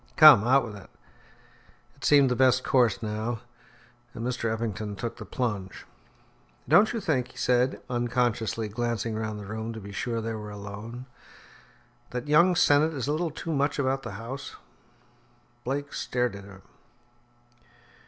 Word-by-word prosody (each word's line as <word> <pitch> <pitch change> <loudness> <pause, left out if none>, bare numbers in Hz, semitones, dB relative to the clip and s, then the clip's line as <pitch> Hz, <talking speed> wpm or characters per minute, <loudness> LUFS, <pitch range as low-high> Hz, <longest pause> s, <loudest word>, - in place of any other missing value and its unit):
"Come, 145 -9 +9
out 135 0 +4
with 110 -3 -8
it." 100 - -12 1.1
It - - -17
seemed 140 -3 +5
the - - +2
best 130 0 +4
course 120 -3 +2
now, 110 +2 -3 0.7
and 115 - -5
Mr. 125 -2 -1
Eppington 110 -2 -3
took 115 +3 -5
the - - -8
plunge. 105 -7 -4 0.8
"Don't 175 - +5
you 230 - -2
think," 140 - 0
he - - -18
said, 125 +1 +1
unconsciously 120 -2 -1
glancing 115 0 -2
round 110 -1 -3
the 105 - -8
room 110 +2 -5
to 110 - -7
be 100 -1 -9
sure 115 +3 -2
they 115 0 -3
were 105 -1 -6
alone, 105 +4 -8 1.0
"that 125 +2 -5
young 170 +5 +5
Sennett 155 0 +4
is 135 -2 -3
a - - +1
little 165 +3 0
too 160 +1 -5
much 140 0 0
about 135 -1 0
the 105 - -7
house?" 125 +7 -7 1.1
Blake 145 +3 -3
stared 125 -3 -1
at 100 -1 -10
him. 95 -1 -14
120 Hz, 155 wpm, -27 LUFS, 110-135 Hz, 1.1 s, Come